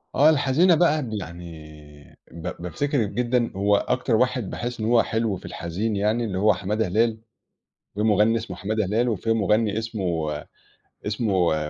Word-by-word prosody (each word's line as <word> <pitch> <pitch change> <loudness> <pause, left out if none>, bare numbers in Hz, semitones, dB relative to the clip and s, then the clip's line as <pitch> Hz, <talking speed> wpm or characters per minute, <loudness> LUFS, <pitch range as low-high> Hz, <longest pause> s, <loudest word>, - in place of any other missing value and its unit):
آه. 150 +3 +6
الحزينة 155 +4 +4
بقى 155 -2 +3
بل 110 -4 -4
يعني 75 -4 -12
ب 85 - -10 0.2
بافتكر 120 - -1
جدًا 120 +3 0
هو 100 +1 +3
أكتر 125 +3 0
واحد 125 -3 +1
باحس 120 0 -5
إن 110 - -2
هو 115 0 +4
حلو 110 -3 -1
في - - -14
الحزين 90 +5 -3
يعني 105 +4 +1
اللي 95 -4 -3
هو 105 +2 +4
حمادة 100 +3 -1
هلال، 110 +4 +1 0.8
في 105 - -2
مُغنّي 110 +1 +3
اسمه 115 0 -6
حمادة 110 +1 -1
هلال 115 +5 +1
وفي 115 +1 -1
مُغنّي 105 0 +1
اسمه 90 -9 -2 0.7
اسمه 100 -6 +1
110 Hz, 160 wpm, -24 LUFS, 95-120 Hz, 0.8 s, آه